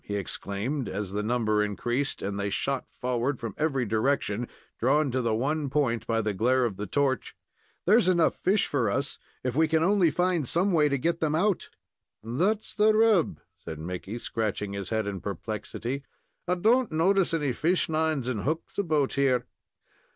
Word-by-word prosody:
he 105 - -4
exclaimed, 100 +7 -3
as 95 0 -4
the 105 +1 -1
number 110 -1 +1
increased, 120 +7 -2
and 100 0 -3
they 100 0 -1
shot 135 +6 -1
forward 125 +2 -2
from 115 -4 -5
every 135 -5 0
direction, 110 0 0 0.3
drawn 140 +3 +2
to 130 +1 0
the 115 -2 +1
one 145 +5 -1
point 130 -5 0
by 115 0 +1
the 105 -1 -1
glare 125 +5 +2
of 110 -5 -2
the 105 +2 -5
torch. 135 +5 0 0.5
"There's 210 +1 +5
enough 175 -3 +3
fish 195 +3 +2
for 125 -7 0
us, 135 +6 -2 0.2
if 125 -1 -2
we 160 +2 +4
can 160 +1 +2
only 190 -2 +4
find 175 -3 0
some 185 +4 +2
way 150 -4 +4
to 140 - +1
get 165 +6 0
them 155 -1 +1
out." 195 +3 +1 0.5
"That's 180 - 0
the 215 0 +4
rub," 215 -6 +3 0.2
said 80 - -6
Mickey, 90 +7 -5
scratching 105 -3 -3
his 100 -1 -5
head 110 -1 0
in 100 -2 -4
perplexity. 110 +6 -4 0.5
"I 180 - +2
don't 230 +6 +3
notice 185 +4 +3
any 150 -6 0
fishlines 160 -4 0
and 120 -5 -1
hooks 160 - -3
about 155 -8 +1
here. 130 -3 +2
135 Hz, 175 wpm, -27 LUFS, 110-160 Hz, 0.5 s, There's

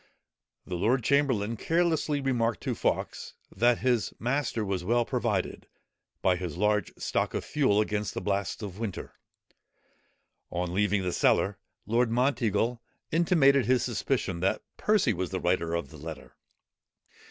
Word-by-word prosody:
The 90 - -7
lord 120 +7 +2
chamberlain 115 -5 +1
carelessly 160 -1 +1
remarked 120 -4 0
to - - -1
Fawkes, - - -2 0.2
that 120 +1 +3
his 120 -4 +1
master 120 -2 -1
was 95 -2 -2
well 120 +5 +2
provided, 115 -8 -2 0.6
by 90 -1 +3
his 85 -3 -5
large 105 -1 +1
stock - - -1
of - - -2
fuel, 130 -9 +2
against 105 -1 -1
the - - -1
blasts 100 +2 -2
of 100 -1 -7
winter. 110 -5 -5 1.4
On 90 0 -3
leaving 100 0 +1
the 90 -1 -1
cellar, 100 0 +2 0.3
Lord 115 +3 +2
Monteagle 120 -2 +1 0.3
intimated 150 - +4
his 125 -1 +3
suspicion 120 -6 -1
that 95 +4 0
Percy 210 - +2
was 95 0 -3
the 95 - -3
writer 85 -2 0
of 85 - -3
the 80 - -11
letter. 75 -3 -9
110 Hz, 140 wpm, -28 LUFS, 95-125 Hz, 1.4 s, intimated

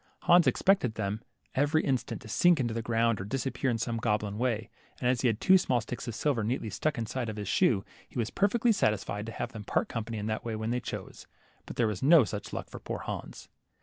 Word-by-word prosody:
Hans 175 -1 +5
expected 155 - +3
them 105 +1 -2 0.3
every 145 +3 +2
instant 130 -3 -1
to - - -10
sink 175 +9 +4
into 120 -3 0
the 115 - -2
ground, 115 -2 +1
or - - -3
disappear 135 +5 -2
in 120 - +1
some 115 +1 -2
goblin 105 -2 -1
way, 120 -3 -1 0.3
and 125 - 0
as 125 -1 +2
he 130 - +3
had 115 -2 +1
two 190 0 +6
small 125 -8 +1
sticks 120 +2 -6
of 115 - -4
silver 135 -5 0
neatly 110 -1 -2
stuck 155 -3 -1
in 115 - -1
the 110 - -7
side 125 -4 -2
of 110 - -4
his 105 -2 -5
shoe, 115 - +2 0.2
he - - -10
was 115 -2 -1
perfectly 230 +4 +2
satisfied 105 - 0
to - - -4
have - - -4
them 110 -2 -7
part - - 0
company 115 -1 -4
in 105 - -4
that 110 0 -2
way 115 -2 -3
when 110 +1 -2
they 125 - +1
chose. - - -7 0.4
But - - -7
there 120 - +2
was 105 -4 -2
no 150 +1 +7
such 105 -2 -5
luck - - -5
for - - -9
poor - - -5
Hans. - - -6
115 Hz, 245 wpm, -29 LUFS, 110-135 Hz, 0.4 s, no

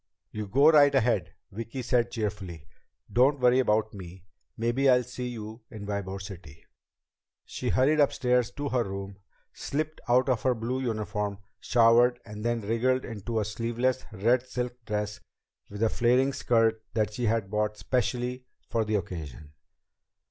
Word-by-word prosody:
"You 105 -1 -5
go 140 +9 +5
right 145 -2 +6
ahead," 125 -2 +1 0.2
Vicki 115 +5 -6
said 120 -1 +1
cheerfully. 100 -8 -4 0.5
"Don't 135 +4 +4
worry 125 0 +4
about 110 -3 +1
me. 95 -2 -10 0.3
Maybe 120 +4 +2
I'll 125 -1 +5
see 125 +1 -6
you 110 -1 -7
in 105 -2 -8
Ybor 100 -1 -4
City." 90 -6 -10 0.8
She - - -4
hurried 145 +4 +3
upstairs 125 -4 +2
to 145 -1 -3
her 125 -2 +1
room, 100 0 -6 0.3
slipped 155 +2 -3
out 125 +2 +4
of 125 -5 +1
her 130 +1 +2
blue 120 +3 -2
uniform, 105 -4 -2 0.2
showered, 120 +1 +4
and 105 -1 -8
then 120 0 0
wriggled 120 +5 0
into 115 0 -3
a 105 - -1
sleeveless, 120 +4 -1
red 115 +5 +2
silk 125 -1 -4
dress 105 0 -3 0.5
with 105 +2 -4
a 110 - +4
flaring 125 +4 +2
skirt 115 -3 +2
that 105 -2 0
she 120 +2 -2
had 110 -3 0
bought 105 0 0
especially 125 +4 -2 0.2
for 115 - +1
the 110 0 -1
occasion. 80 -6 -5
115 Hz, 155 wpm, -28 LUFS, 105-125 Hz, 0.8 s, right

